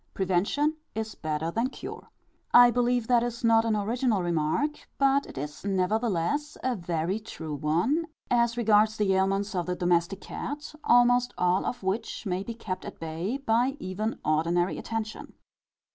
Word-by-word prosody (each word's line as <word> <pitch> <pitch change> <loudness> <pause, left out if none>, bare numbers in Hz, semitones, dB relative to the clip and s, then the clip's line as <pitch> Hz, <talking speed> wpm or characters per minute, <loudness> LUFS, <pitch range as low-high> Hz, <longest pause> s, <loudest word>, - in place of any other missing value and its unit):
Prevention 200 - +1 0.2
is 220 0 -3
better 155 +1 -3
than 230 +7 0
cure. - - -9 0.5
I 245 0 +9
believe 245 -1 +1
that 245 -2 +4
is 240 +1 -4
not 225 0 +4
an 225 -1 +1
original 220 -1 0
remark; 170 - -1
but 275 0 +3
it - - -11
is 145 +2 -6
nevertheless 205 - 0
a 255 -1 +1
very 175 +1 -2
true 160 -8 -7
one, 175 - 0 0.2
as 235 -1 +2
regards 215 -1 +3
the 200 -2 +2
ailments 195 +2 +1
of 180 -2 -2
the 180 - -1
domestic 175 +2 +1
cat, 295 +3 -6
almost 245 0 +4
all 180 +1 +2
of 245 - -4
which 210 +5 -2
may 185 -1 -1
be 230 +3 -6
kept 185 -5 -5
at - - -9
bay 165 +9 -3
by 255 +1 +1
even 205 +4 -3
ordinary 170 +4 +1
attention. 220 -1 -5
215 Hz, 160 wpm, -27 LUFS, 180-240 Hz, 0.5 s, I